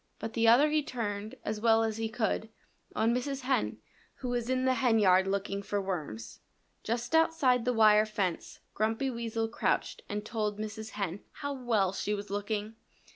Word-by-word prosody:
But 225 - -6
the 230 -1 +2
other 275 +7 +6
he 305 0 +3
turned, 215 -6 -4
as 215 0 -3
well 225 0 +4
as 220 -1 -1
he 225 0 -2
could, 220 -1 -1 0.5
on 225 +2 +2
Mrs. 270 +2 -2
Hen, 260 +1 0 0.4
who 255 - -5
was 240 -1 -2
in 255 0 +1
the 260 - +4
henyard 215 -7 +4
looking 200 0 -1
for 200 +1 -2
worms. 155 - -5 0.4
Just 240 +4 -2
outside 320 -7 +3
the 250 - +2
wire 215 -1 +5
fence 195 -5 -3
Grumpy 225 +5 0
Weasel 230 -1 -2
crouched 225 - -1
and 210 +1 -3
told 215 -2 -2
Mrs. 215 +1 -6
Hen 195 -2 -2
how 285 -1 -4
well 225 -8 +1
she 210 +1 -1
was 205 0 -7
looking. 205 +1 -2
220 Hz, 175 wpm, -30 LUFS, 205-245 Hz, 0.5 s, other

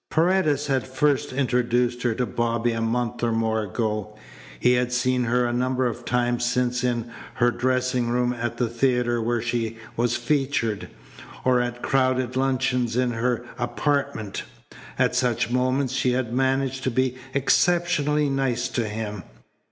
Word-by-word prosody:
Paredes 160 -4 +2
had 135 -5 0
first 140 +1 +1
introduced 125 -2 +1
her 120 -2 0
to 125 - 0
Bobby 120 0 0
a 115 0 -2
month 115 +1 -1
or 120 -1 +1
more 110 -1 +1
ago. 105 0 -3 0.4
He 125 - +4
had 125 0 +1
seen 125 0 +1
her 125 +1 +2
a 120 - -1
number 130 +1 0
of 120 0 -3
times 120 -1 0
since 125 0 0
in 120 -1 -1 0.2
her 120 -1 +3
dressing 125 -1 0
room 125 0 +1
at 120 -1 -3
the 120 - +1
theatre 120 0 +1
where 115 0 0
she 115 -1 -2 0.2
was 120 0 +1
featured, 120 -5 -1 0.6
or 125 -1 +4
at 120 0 -4
crowded 130 -1 +1
luncheons 130 -2 0
in 125 -1 +2
her 120 +1 -1
apartment. 120 -5 -1 0.6
At - - +2
such 125 -2 +1
moments 130 +1 +1
she 130 -1 +1
had 125 -2 -1
managed 135 0 0
to - - +2
be 130 +1 0 0.2
exceptionally 150 0 +2
nice 135 -3 0
to 120 -3 -1
him. 105 -2 -4
125 Hz, 155 wpm, -24 LUFS, 120-130 Hz, 0.6 s, He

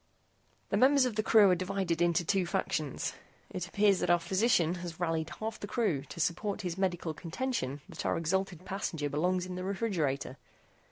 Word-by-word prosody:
"The - - +1
members 270 +1 +5
of 245 -4 -2
the 215 - +2
crew 215 -3 +6
are - - +4
divided 185 -2 -1
into 175 0 +2
two 190 0 +1
factions. 155 -4 -2 0.4
It 180 -1 -4
appears 200 0 +3
that - - -1
our 175 - +6
physician 175 -1 +2
has 170 -2 -7
rallied 165 -2 -1
half 220 0 -4
the 205 - -6
crew 205 - 0
to 170 - -10
support 195 +6 -1
his 180 -3 -3
medical 180 -4 -1
contention 165 - -3
that - - -7
our - - +1
exhalted 180 +1 -1
passenger 165 -7 -3
belongs 180 +5 +1
in 185 - -6
the 180 0 -4
refrigerator. 175 - -1
180 Hz, 180 wpm, -31 LUFS, 165-200 Hz, 0.4 s, crew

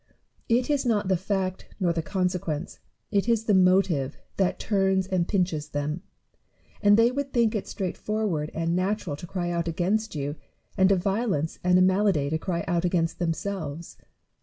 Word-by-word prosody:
It 245 +2 +3
is 285 -2 +1
not 215 -6 +1
the 190 - +4
fact 190 0 -2
nor 175 -3 +2
the 165 - -1
consequence, 180 -3 -2 0.3
it 205 +2 +1
is 230 -2 +2
the 215 - +2
motive, 185 -7 +3 0.2
that 190 -2 +1
turns 190 -2 +1
and 180 -2 0
pinches 175 -7 0
them; 150 +3 -3 0.8
and 205 0 +6
they 230 +2 +5
would 275 +1 -3
think 230 -3 +3
it 210 - -3
straightforward 190 -4 -2
and 165 +1 0
natural 185 -3 -1
to 175 - -9
cry 175 -1 -2
out 170 0 -1
against 190 +5 0
you, 145 +1 -3 0.4
and 190 0 +4
a - - +6
violence 190 -4 -1
and 180 0 +4
a 185 - +6
malady 185 -6 +2
to 160 - 0
cry 170 -1 -2
out 170 0 +1
against 165 -2 0
themselves. 170 -2 -3
185 Hz, 170 wpm, -26 LUFS, 165-205 Hz, 0.8 s, and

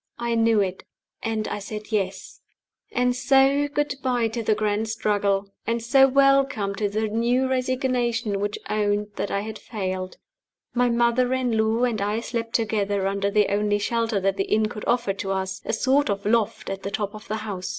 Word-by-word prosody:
I 235 0 -1
knew 225 -2 +3
it 190 -1 -3 0.4
and 220 -1 -2
I - - -3
said 210 +2 -7
Yes. 195 -3 -3 0.5
And 250 0 +1
so 270 +2 +3
good 290 0 -1
by 245 -3 +1
to 230 +1 -3
the 215 -1 +2
grand 215 +1 -1
struggle! 205 -3 0
And 230 +1 +1
so 270 +3 +6
welcome 275 -6 +3
to 205 +1 -1
the 215 +2 -1
new 240 +4 +1
resignation 250 -4 0
which 205 +1 -2
owned 210 0 0
that - - -2
I 200 - -1
had 220 +1 -6
failed. 185 -4 -4 0.6
My 245 0 +2
mother 240 +1 +2
in 250 -3 0
law 220 +2 +1
and 235 -4 0
I 210 +2 0
slept 230 -1 -4
together 205 -3 0
under 200 +1 0
the 210 0 +2
only 205 0 +2
shelter 225 0 0
that 195 +1 0
the 195 - 0
inn 215 0 +1
could 210 -2 -7
offer 240 -4 +1
to 195 0 -3
us 190 0 -3
a - - -1
sort 265 +4 +2
of 200 0 -2
loft 215 -2 0
at 195 0 -5
the 195 - -4
top 205 0 -3
of 215 0 -11
the 215 - -2
house. 190 -3 -4
220 Hz, 190 wpm, -24 LUFS, 205-240 Hz, 0.6 s, so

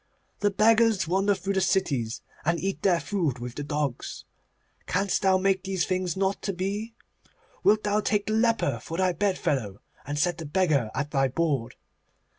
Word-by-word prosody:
The 205 - +2
beggars 220 -1 +3
wander 195 +3 +2
through 195 +1 -3
the 190 - +1
cities, 145 -12 0 0.2
and 170 +2 +1
eat 195 0 -3
their 180 -3 +3
food 155 -3 -1
with 120 0 -6
the 145 - -5
dogs. 145 -3 -3 0.6
Canst 195 +2 0
thou 190 -1 +4
make 190 0 +1
these 190 -3 -1
things 185 -2 -1
not 195 +1 0
to 195 - -2
be? 205 +5 -3 0.7
Wilt 215 +1 +4
thou 205 0 +1
take 205 -1 0
the 215 - -1
leper 220 - +2
for 165 - -6
thy 185 -1 +2
bedfellow, 150 - -1 0.2
and 145 +1 -4
set 170 +2 +1
the 165 - -5
beggar 150 - +1
at 145 +2 -2
thy 135 -2 +2
board? 140 -3 -1
185 Hz, 175 wpm, -26 LUFS, 145-200 Hz, 0.7 s, thou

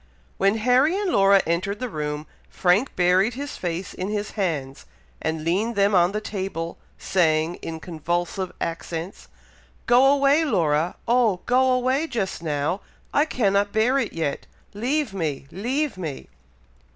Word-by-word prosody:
When 195 +3 +3
Harry 255 - +3
and 400 -3 -1
Laura 195 -3 +5
entered 185 +5 -1
the 255 - -2
room, 150 -5 -4 0.2
Frank 190 +9 +1
buried 185 +6 +3
his 285 +1 -5
face 175 +1 -4
in 185 +2 -4
his 210 0 -3
hands, 150 -9 -3 0.4
and 160 -1 -2
leaned 200 +8 0
them 200 +1 +3
on 175 -1 +4
the 210 - -2
table, 190 -5 -5 0.2
saying, 160 -2 +1
in 160 -1 -5
convulsive 175 +3 -3
accents, 165 +2 -5 0.6
"Go 245 +2 +5
away, 280 +2 +4
Laura! 165 - +1
oh 230 -6 +3
go 260 +1 +3
away 255 +5 +1
just 215 - -3
now! 155 +4 -1 0.3
I 290 - +4
cannot 205 -7 +1
bear 245 +5 +3
it 230 - -2
yet! 160 -4 -3 0.3
leave 250 +3 -1
me! 155 -8 -3
leave 255 - -2
me!" 155 -6 -6
195 Hz, 145 wpm, -24 LUFS, 165-245 Hz, 0.6 s, Laura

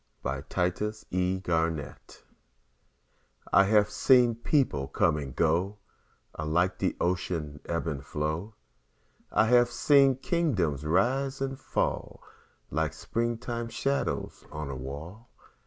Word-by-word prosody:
Paul 70 +2 -2 0.2
Laurence 105 +4 -1
Dunbar 90 -2 +1
Old 80 -5 -8 1.3
I 100 - +7
HAVE 105 0 +4
seen 125 +1 +5
peoples 115 - 0
come 80 -2 +3
and 70 -4 -6
go 85 +5 +1 0.6
Alike 85 +4 0
the - - 0
Ocean'd 85 -4 -2
ebb 85 0 -1
and 70 -4 -3
flow; 80 +9 -3 0.8
I - - +4
have 120 +1 +5
seen 135 +2 +4
kingdoms 115 - 0
rise 130 - +1
and 135 0 -3
fall - - -2 0.5
Like 80 +1 0
springtime 115 0 -3
shadows 140 +4 -2
on 75 -2 -5
a - - -5
wall. 80 - -8
90 Hz, 115 wpm, -28 LUFS, 75-120 Hz, 1.3 s, I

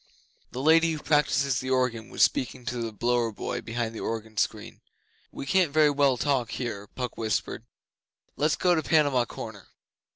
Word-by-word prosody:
The 130 - -5
Lady 165 +1 +5
who - - -3
practices 140 -3 +2
the 130 - -5
organ 125 -4 0
was - - +2
speaking 125 -1 0
to 120 0 -3
the 115 -1 -3
blower 120 +2 0
boy 105 - -4
behind 115 -1 -3
the 110 - -7
organ 110 -1 -4
screen. - - -2 0.5
'We - - -7
can't 180 +1 +2
very 155 0 +4
well 140 -2 +2
talk 130 -4 0
here,' 105 -5 -5
Puck 125 +3 -6
whispered. 110 0 -2 0.7
'Let's 150 +1 +1
go 180 -1 +2
to 160 - +1
Panama 145 -7 +3
Corner. - - -9
130 Hz, 170 wpm, -27 LUFS, 115-145 Hz, 0.7 s, Lady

